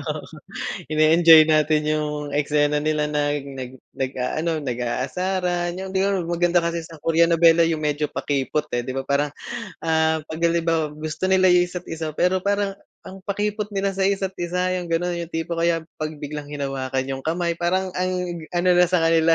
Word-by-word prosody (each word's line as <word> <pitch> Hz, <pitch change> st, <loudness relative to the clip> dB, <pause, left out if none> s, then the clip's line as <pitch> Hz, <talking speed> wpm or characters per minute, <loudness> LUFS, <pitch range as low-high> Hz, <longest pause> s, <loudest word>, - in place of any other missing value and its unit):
oo. -, -, -3 dB, 0.7 s
Ine-enjoy 155 Hz, +1 st, +7 dB
natin 155 Hz, -1 st, +2 dB
yung 155 Hz, 0 st, 0 dB, 0.2 s
eksena 145 Hz, 0 st, +1 dB
nila 155 Hz, -1 st, +1 dB
nag 145 Hz, -1 st, -1 dB
nag 130 Hz, -2 st, -7 dB, 0.2 s
nag-aano 135 Hz, +5 st, -2 dB
nag-aasaran 175 Hz, +8 st, -2 dB
yung 190 Hz, 0 st, -6 dB
di 190 Hz, -, +2 dB
ba, 195 Hz, 0 st, +1 dB
ma -, -, -2 dB
maganda 175 Hz, +1 st, +3 dB
kasi 170 Hz, 0 st, -1 dB
sa 160 Hz, 0 st, -12 dB
Korean 165 Hz, +2 st, +3 dB
nobela 165 Hz, 0 st, +5 dB
yung 165 Hz, -1 st, +1 dB
medyo 150 Hz, -1 st, -1 dB
pakipot 145 Hz, +1 st, -1 dB
eh, 120 Hz, -, 0 dB
di 125 Hz, -, -6 dB
ba? 135 Hz, +1 st, -4 dB
Parang 145 Hz, +1 st, +1 dB, 0.5 s
ah, 160 Hz, -1 st, +1 dB
'pag 155 Hz, +1 st, -8 dB
halimbawa 165 Hz, -2 st, 0 dB
gusto 155 Hz, +3 st, -3 dB
nila 185 Hz, -1 st, +4 dB
yung 180 Hz, 0 st, +5 dB
isa't-isa 165 Hz, -3 st, -6 dB
pero 180 Hz, +3 st, +2 dB
parang, 200 Hz, +1 st, -1 dB, 0.2 s
ang 190 Hz, -, -10 dB
pakipot 210 Hz, +1 st, -1 dB
nila 195 Hz, 0 st, 0 dB
sa 195 Hz, -, +1 dB
isa't-isa, 185 Hz, -2 st, -1 dB
yung 180 Hz, -, -5 dB
ganon. 175 Hz, +1 st, 0 dB
Yung 170 Hz, 0 st, -6 dB
tipo, 165 Hz, +1 st, -2 dB
kaya 165 Hz, -1 st, +1 dB, 0.2 s
'pag 155 Hz, 0 st, -3 dB
biglang 145 Hz, 0 st, -5 dB
hinawakan 135 Hz, -2 st, -3 dB
yung 135 Hz, 0 st, -4 dB
kamay 170 Hz, +1 st, -1 dB
parang, 185 Hz, +2 st, 0 dB
ang 185 Hz, 0 st, 0 dB, 0.4 s
ano 175 Hz, +1 st, +2 dB
na 180 Hz, -, +6 dB
sa 180 Hz, -1 st, +1 dB
kanila 165 Hz, 0 st, +4 dB
165 Hz, 175 wpm, -23 LUFS, 150-180 Hz, 0.7 s, Ine-enjoy